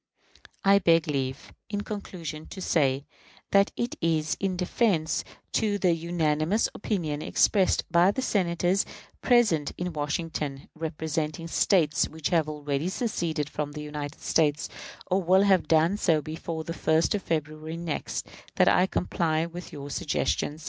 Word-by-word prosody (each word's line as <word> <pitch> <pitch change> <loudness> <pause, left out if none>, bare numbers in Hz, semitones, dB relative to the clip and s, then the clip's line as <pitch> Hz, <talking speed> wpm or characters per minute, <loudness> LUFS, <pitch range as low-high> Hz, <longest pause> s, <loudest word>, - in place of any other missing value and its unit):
I 200 0 +6
beg 165 -2 +3
leave, 135 -2 -3 0.2
in 205 -1 -2
conclusion, 170 -7 -6
to 195 - -9
say 140 -6 +1 0.5
that 200 0 +4
it 240 +1 -2
is 160 -2 +1
in 190 -2 -1
deference 180 -3 +1 0.3
to 210 -2 +1
the 180 -3 +3
unanimous 165 +3 +1
opinion 160 -9 -2
expressed 190 +2 +3
by 170 +2 +5
the 260 +6 -1
Senators 180 -2 +1 0.4
present 215 - +3
in 180 -1 -3
Washington, 150 -2 -3
"representing 160 0 -3
States 165 -2 +2
which 160 -2 -3
have 160 -3 +2
already 150 +2 -2
seceded 170 - -2
from 150 -1 -4
the 150 0 -6
United 150 -1 -6
States, 150 -1 +1 0.4
or 185 +2 +1
will 190 +2 +4
have 190 -5 +3
done 165 +5 +3
so 165 -6 +3
before 160 +2 -5
the 165 - -5
1st 160 0 +2
of 205 - -1
February 155 0 -3
next," 160 - -3 0.3
that - - +4
I 180 +1 +5
comply 165 -3 0
with 175 +1 -8
your 145 -1 -7
suggestions. 150 +1 -1
165 Hz, 145 wpm, -27 LUFS, 150-185 Hz, 0.5 s, I